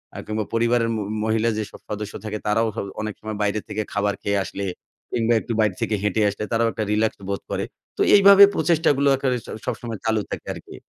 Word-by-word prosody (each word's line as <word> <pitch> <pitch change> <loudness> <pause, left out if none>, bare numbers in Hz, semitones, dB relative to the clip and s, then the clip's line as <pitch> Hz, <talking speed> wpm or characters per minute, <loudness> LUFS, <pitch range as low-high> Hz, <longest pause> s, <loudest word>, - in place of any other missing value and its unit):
আ - - -7
কিংবা 110 0 -2
পরিবারের 115 0 +2
মো 110 - -2 0.2
মহিলা 110 +1 +2
যে 110 - 0
সব - - -13
সদস্য 105 0 -4
থাকে 105 0 -3
তারাও 115 +2 +2
হ - - -13 0.2
অনেক 110 -1 -3
সময় 110 -1 -5
বাইরে 105 +1 0
থেকে 110 - -2
খাবার 105 0 +1
খেয়ে 100 0 0
আসলে 100 +1 -6 0.5
কিংবা 115 0 +2
একটু 115 - -4
বাইরে 105 -4 +2
থেকে 110 - 0
হেঁটে 105 +1 +1
আসলে 100 - -5
তারাও 115 0 +2
একটা 110 - -3
রিল্যাক্স 110 +1 +1
বোধ 100 - -2
করে। - - -1 0.3
তো - - -1
এইভাবে 200 0 +9
প্রচেষ্টাগুলো 150 -4 +2
কে 135 - 0 0.4
স-সবসময় 115 -3 -4
চালু 110 -1 +2
থাকে - - -5
আরকি। - - -11
110 Hz, 205 wpm, -23 LUFS, 105-115 Hz, 0.5 s, এইভাবে